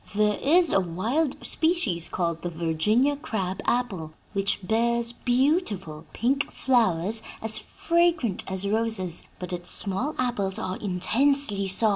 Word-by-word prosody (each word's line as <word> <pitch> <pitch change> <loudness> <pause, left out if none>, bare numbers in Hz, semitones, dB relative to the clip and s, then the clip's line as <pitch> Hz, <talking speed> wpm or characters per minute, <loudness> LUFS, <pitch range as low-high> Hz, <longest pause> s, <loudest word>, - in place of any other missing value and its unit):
There 210 -1 +2
is 335 +3 +3
a - - +4
wild 220 - -2
species 280 - 0
called 170 -2 -2
the 175 - -3
Virginia 175 - +1
crab 195 -9 -4
apple, 195 -11 -1 0.2
which 195 -1 0
bears 235 +1 +1
beautiful 240 - -1
pink 275 +4 -1
flowers 220 -4 +1 0.2
as 220 0 +2
fragrant 335 - 0
as 190 +1 -3
roses, 215 -5 +1
but 180 0 -7
its 175 0 0
small 230 +10 +2
apples 205 -7 -1
are 185 0 -4
intensely 210 +3 +1
sour. 215 +4 +5
215 Hz, 130 wpm, -25 LUFS, 185-255 Hz, 0.2 s, sour